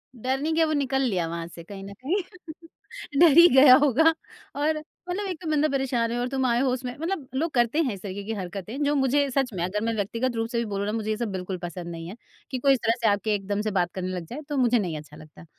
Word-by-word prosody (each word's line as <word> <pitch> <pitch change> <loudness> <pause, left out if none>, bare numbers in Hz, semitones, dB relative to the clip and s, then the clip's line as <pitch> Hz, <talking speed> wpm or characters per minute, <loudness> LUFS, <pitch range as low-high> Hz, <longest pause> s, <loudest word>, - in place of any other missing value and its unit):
डर 255 +3 -1
नहीं 310 +3 -1
गया 325 0 +3
वो 310 - -1
निकल 270 -2 0
लिया 190 -10 0
वहाँ 165 0 -5
से 170 0 -11
कहीं 195 +3 -9
ना 200 +1 -8
कहीं, 310 - -1 1.0
डर 335 -2 +8
ही 340 - +10
गया 265 -1 +9
होगा 295 +3 +4 0.4
और 305 +2 +1 0.3
मतलब 395 +3 -2
एक 360 -4 -5
तो 325 - -4
बंदा 305 0 +3
परेशान 255 -4 0
है 240 - -2
और 245 - -1
तुम 265 0 -1
आए 240 -1 +2
हो 270 - +2
उसमें 255 -1 -4
मतलब 325 -4 -3
लोग 320 +5 0
करते 240 +4 +2
हैं 255 -8 -1
इस 190 - -13
तरीके 200 0 -6
की 225 - -4
हरकतें 200 +7 -5
जो 290 +1 +2
मुझे 275 +1 +2
सच 270 -1 +1
में 175 -3 -2
अगर 200 +4 -2
मैं 230 - 0
व्यक्तिगत 230 +4 -2
रूप 225 0 -1
से 240 - -3
भी 235 - -1
बोलूँ 200 0 -2
ना - - -1
मुझे 220 -1 -3
ये 215 - -1
सब 230 -4 -3
बिल्कुल 185 0 -4
पसंद 175 0 -6
नहीं 165 0 -7
है 195 - -8 0.4
कि 260 - -1
कोई 275 +2 +4
इस 260 - 0
तरह 225 - +4
से 230 - +3
आके 210 +1 +1
एकदम 205 +1 -2
से 215 - -2
बात 175 -3 0
करने 185 -1 -3
लग 175 -2 -5
जाए 265 - -7
तो 290 - -2
मुझे 245 -2 +3
नहीं 175 -6 -2
अच्छा 150 0 -11
लगता। 155 +2 -14
235 Hz, 275 wpm, -25 LUFS, 195-275 Hz, 1.0 s, ही